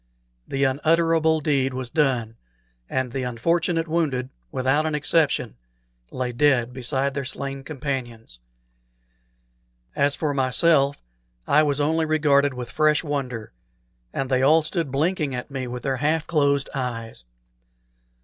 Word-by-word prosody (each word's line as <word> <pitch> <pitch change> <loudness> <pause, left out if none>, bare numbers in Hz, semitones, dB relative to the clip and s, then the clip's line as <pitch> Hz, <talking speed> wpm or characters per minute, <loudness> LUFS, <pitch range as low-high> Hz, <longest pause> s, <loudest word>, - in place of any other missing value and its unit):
The 135 0 -1
unutterable 160 +3 +2
deed 135 -3 +1
was 130 -1 -4
done, 125 -7 0 0.5
and 130 -2 -1
the 135 - -3
unfortunate 165 +7 0
wounded, 145 -6 -1 0.2
without 135 +4 +1
an 155 - -1
exception, 150 - +1 0.5
lay 125 -1 -3
dead 125 -2 +2
beside 135 +2 -1
their 140 0 -3
slain 135 +1 -5
companions. 125 - -5 1.6
As 140 0 +2
for 150 -3 -1
myself, 140 +2 +3 0.5
I 150 - +5
was 145 -2 +1
only 160 +2 +1
regarded 145 -3 +2
with 125 -1 -6
fresh 155 +1 +2
wonder, 130 -7 -4 0.6
and 135 - -2
they 130 -1 +1
all 155 +4 +5
stood 160 -2 -2
blinking 150 -1 0
at 125 +3 -6
me 130 -2 -4
with 125 0 -6
their 135 -1 -1
half 155 +3 0
closed 140 -3 +1
eyes. 115 - -4
140 Hz, 130 wpm, -23 LUFS, 130-155 Hz, 1.6 s, I